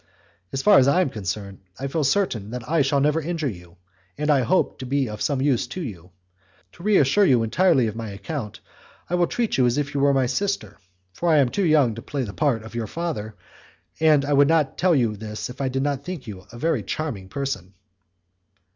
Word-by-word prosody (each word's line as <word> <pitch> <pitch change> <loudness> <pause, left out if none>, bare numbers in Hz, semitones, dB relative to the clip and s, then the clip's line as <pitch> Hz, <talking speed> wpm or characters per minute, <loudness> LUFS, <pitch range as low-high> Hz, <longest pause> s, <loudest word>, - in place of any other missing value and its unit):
As 135 - -3
far 210 - +7
as 130 - +4
I 175 +7 +4
am 170 - 0
concerned, 100 -1 -5 0.2
I 135 - -4
feel 150 +3 -1
certain 135 - 0
that 120 0 -6
I 165 0 +2
shall 140 0 +2
never 150 +3 +2
injure 165 -1 -2
you, 90 -6 -8 0.4
and 150 +1 +1
I 140 -3 +4
hope 185 +8 +1
to 130 - -6
be 135 0 0
of 105 -1 -7
some 135 -3 0
use 135 -5 +1
to 185 - -6
you. 90 - -8 0.6
To - - -16
reassure 200 -2 +4
you 125 -10 +4
entirely 130 0 +3
on 110 - -4
my 115 -1 -5
account, 105 +3 -6 0.5
I - - -1
will 175 -1 +3
treat 235 - -1
you 125 - +5
as 120 +3 0
if 145 0 -2
you 140 - -1
were 140 0 +4
my 135 -2 +2
sister, 125 - -2 0.3
for 170 - -1
I 155 - +5
am 135 -4 +4
too 200 +8 0
young 150 -8 +4
to 115 - -8
play 140 +2 -3
the 100 -4 -6
part 135 -8 0
of 110 - -11
your 115 -2 -3
father, 110 -9 -4 0.6
and 155 -3 +4
I 145 - 0
would 140 0 +5
not 155 -4 +2
tell 175 -1 +3
you 120 -5 +3
all 105 - -6
this 105 +3 -6
if 130 - -9
I 135 - 0
did 135 +1 -1
not 140 -2 -1
think 180 -7 -6
you 100 -3 -9
a 120 - -10
very 155 -2 0
charming 100 -3 -4
person." 100 -9 -4
135 Hz, 230 wpm, -23 LUFS, 110-155 Hz, 0.6 s, far